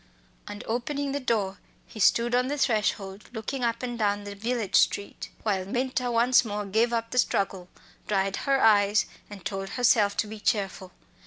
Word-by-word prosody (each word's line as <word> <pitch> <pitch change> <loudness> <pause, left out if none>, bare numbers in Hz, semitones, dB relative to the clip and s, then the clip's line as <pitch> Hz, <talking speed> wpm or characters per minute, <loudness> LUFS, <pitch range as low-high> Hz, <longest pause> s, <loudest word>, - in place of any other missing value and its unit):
And 205 0 -7
opening 275 +5 -2
the 285 - -1
door 210 -7 -1 0.3
he 220 - -12
stood 235 +4 +3
on 250 +1 +2
the 290 +2 -2
threshold 210 -5 -1
looking 245 +3 -4
up 230 +1 -1
and 240 -1 -4
down 205 -1 +1
the 205 0 -7
village 225 0 -3
street, 200 - +1
while 195 -4 0
Minta 250 +4 -1
once 240 +2 +4
more 210 -2 -4
gave 220 +4 +1
up 230 -1 -2
the 250 - +1
struggle, 190 -5 0 0.4
dried 195 -1 0
her 275 -1 +1
eyes, 205 -1 +4 0.2
and 200 -4 -11
told 195 -1 -4
herself 215 -4 +3
to - - +1
be 215 0 -8
cheerful. 195 -4 -1
220 Hz, 175 wpm, -27 LUFS, 200-245 Hz, 0.4 s, once